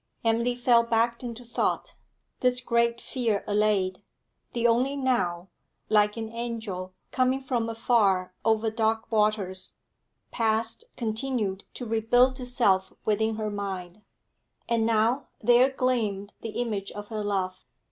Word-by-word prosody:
Emily 235 +2 +2
fell 240 -1 +4
back 235 0 +1
into 240 0 -6
thought; 235 - -1 0.5
this 250 -1 +3
great 235 -1 +1
fear 230 -7 -1
allayed, 205 -3 +1 0.5
the 235 -1 -1
only 245 +4 +3
now, 195 -10 0 0.4
like 210 0 +3
an 225 -1 -3
angel 220 -6 -5 0.2
coming 255 +1 +2
from 245 -4 -1
afar 205 -5 +2
over 220 0 +2
dark 225 0 0
waters, 210 -4 0 0.6
past 225 - 0
continued 220 -4 -2
to 245 - -5
rebuild 245 +4 +3
itself 235 -7 +1
within 220 +1 +1
her 215 -1 -3
mind. 195 -1 -5 0.7
And 230 -1 +2
now, 230 +4 +2
there 245 +3 +5
gleamed 225 -7 -1
the 225 - -5
image 210 -5 -2
of 205 0 -8
her 215 -2 -3
love. 190 -2 -2
225 Hz, 125 wpm, -27 LUFS, 205-240 Hz, 0.7 s, there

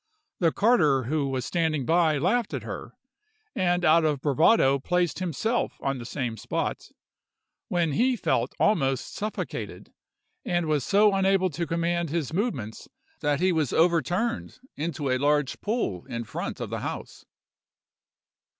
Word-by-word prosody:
The 165 -3 +3
carter 165 - +3
who 140 +3 -1
was 130 -2 -2
standing 160 -5 0
by 165 -1 +3
laughed 200 - 0
at - - -5
her, - - -7 0.6
and 175 -4 +1
out 165 +1 +5
of 150 -3 +1
bravado 140 - +4
placed 180 +4 0
himself 190 - -1
on 135 -1 -2
the 120 - -7
same 120 -5 -3
spot, - - -3 0.8
when 170 -3 0
he 250 - +2
felt - - -1
almost 135 - +1
suffocated, 215 +1 -5 0.5
and 175 -2 0
was 150 -3 0
so 205 - +4
unable 195 -1 +2
to 170 +3 -3
command 170 0 -1
his 160 -1 -2
movements 160 - -3 0.3
that 145 -1 0
he 185 0 +3
was 155 -6 0
overturned 175 - +1 0.2
into 150 -3 -2
a 130 - +1
large 145 0 +1
pool 205 - -2
in 120 -3 -4
front 110 - -5
of - - -5
the - - -2
house. - - -6
165 Hz, 145 wpm, -26 LUFS, 140-185 Hz, 0.8 s, out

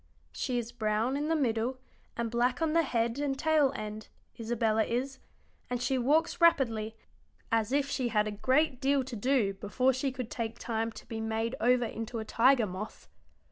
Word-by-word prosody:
She 250 -2 -2
is 235 -1 -3
brown 220 +2 0
in 295 +2 -1
the 325 - +2
middle, 245 -3 0 0.4
and 235 -1 -2
black 245 +1 +1
on 320 -2 +1
the 335 - +5
head 235 -3 -1
and 280 -2 -1
tail 305 -2 +3
end, 215 -2 -6 0.3
Isabella 225 -1 +1
is, 260 +4 -2 0.5
and 245 0 -1
she 260 +1 0
walks 310 +8 +2
rapidly, 230 -10 +3 0.6
as 225 0 +1
if 280 0 +2
she 265 -3 -1
had 215 -2 +1
a - - -2
great 260 +6 +1
deal 275 0 +2
to 255 -1 -7
do 230 -3 +1
before 250 +7 +1
she 260 +2 -1
could 250 -3 -6
take 230 -1 -4
time 225 -1 -2
to - - -11
be 225 -1 -5
made 225 +2 -1
over 245 +1 +3
into 225 +1 -5
a 220 - -4
tiger 245 +2 +4
moth. 195 +3 -7
240 Hz, 185 wpm, -30 LUFS, 225-270 Hz, 0.6 s, the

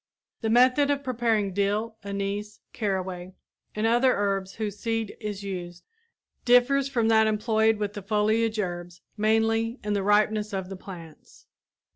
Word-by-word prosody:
The 220 - -1
method 255 +5 +4
of 280 -1 0
preparing 225 -6 0
dill, 205 +3 -1
anise, 200 +1 -4
caraway 185 -3 -3 0.4
and 215 +1 -1
other 240 +3 +4
herbs 195 -1 -1
whose 210 -2 -4
seed 225 -2 -2
is 205 -2 -5
used, 175 -3 -6 0.6
differs 255 +3 +4
from 235 -4 +1
that 220 -1 +5
employed 220 0 +2
with 205 -1 -3
the 205 - -6
foliage 215 +2 +1
herbs 175 -2 -4
mainly 225 +2 +1
in 210 0 -1
the 200 - 0
ripeness 210 +1 +2
of 190 -1 -3
the 195 - -6
plants. 170 -4 -12
210 Hz, 145 wpm, -26 LUFS, 195-225 Hz, 0.6 s, that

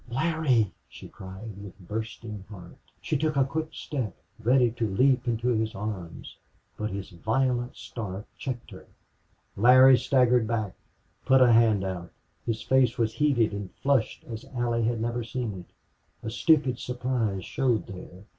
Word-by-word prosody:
"Larry!" 135 - +1 0.2
she - - -11
cried, 95 +4 -9
with 100 -2 -10
bursting 105 +1 -6
heart. 90 -5 -11 0.3
She - - -2
took 155 +1 0
a 135 - +4
quick 160 +3 -3
step, 130 -8 -4 0.2
ready 120 +1 +3
to 115 -2 -2
leap 130 +5 +2
into 120 +1 0
his 110 -2 0
arms, 95 -4 -6 0.4
but 105 0 -3
his 100 0 -6
violent 120 +6 0
start 100 -1 -6
checked 125 -3 -6
her. - - -12 0.7
Larry 130 +4 +7
staggered 125 -3 +3
back 110 -4 -1 0.5
put 135 0 +5
a 125 -2 +6
hand 110 -4 +4
out. 90 -2 -4 0.4
His 115 -1 -2
face 130 -2 +3
was 115 -1 +1
heated 125 -8 +2
and 100 -2 -5
flushed 135 -5 +1
as 115 -1 -7
Allie 120 -1 0
had 115 0 0
never 120 +1 -2
seen 115 -1 -3
it. 90 - -14 0.5
A 110 - -3
stupid 135 -1 +3
surprise 120 -6 -2
showed 125 -5 0
there. 90 0 -10
115 Hz, 155 wpm, -27 LUFS, 105-130 Hz, 0.7 s, Larry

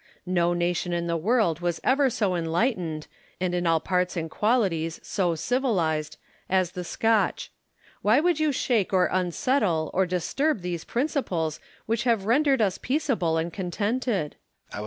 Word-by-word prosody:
No 175 -1 +1
nation 175 0 -1
in 170 0 -1
the 170 0 -1
world 175 -2 +1
was 175 -1 -1
ever 270 +1 +3
so 210 -5 0
enlightened, 170 - -1 0.3
and 180 -1 -1
in 175 -1 0
all 165 -1 +3
parts 180 +2 -1
and 160 -1 -3
qualities 190 -8 0
so 175 -4 0
civilised, 165 - 0 0.3
as 185 -2 +2
the 180 - -5
Scotch. 225 +4 0 0.5
Why 220 +6 +4
would 340 0 +2
you 310 -1 +2
shake 230 -7 0
or 185 -1 +4
unsettle 180 - 0
or 190 0 +2
disturb 200 - 0
those 175 -2 -4
principles 185 - -1 0.3
which 230 +1 -1
have 230 -5 +2
rendered 265 +1 +3
us 190 -3 0
peaceable 250 - 0
and 165 +1 -2
contented? 205 - -2 0.4
Hume. - - -5
185 Hz, 155 wpm, -26 LUFS, 170-235 Hz, 0.5 s, Why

